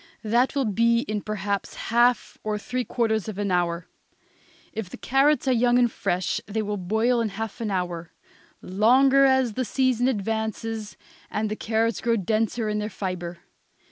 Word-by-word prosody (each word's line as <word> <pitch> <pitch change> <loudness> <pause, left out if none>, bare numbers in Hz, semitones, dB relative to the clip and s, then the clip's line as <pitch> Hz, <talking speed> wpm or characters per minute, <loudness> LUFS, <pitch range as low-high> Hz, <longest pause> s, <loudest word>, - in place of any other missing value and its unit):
That 240 +6 +2
will 275 -2 +1
be 230 +2 +2
in 215 -3 -3
perhaps 200 -1 -3
half 240 +1 +1
or 215 -1 -1
three 250 +4 -3
quarters 220 -4 0
of 215 -3 -5
an 205 -2 -1
hour; 175 -1 0 0.9
if 220 -5 -5
the - - -9
carrots 275 +2 +2
are - - +4
young 245 0 +3
and 240 -2 +3
fresh 175 -2 -1
they 215 +1 -2
will 210 0 -2
boil 220 +6 +1
in 225 - 0
half 220 +3 -6
an 220 - -1
hour; 175 -3 -3 0.5
longer 260 +8 +4
as 265 -4 +3
the 255 - -1
season 255 -1 +1
advances 220 -1 -3 0.3
and 215 0 -2
the - - -1
carrots 225 +1 0
grow 230 0 +2
denser 220 +3 0
in 210 0 -1
their 210 0 -3
fibre. 180 -4 -5
220 Hz, 170 wpm, -25 LUFS, 205-240 Hz, 0.9 s, are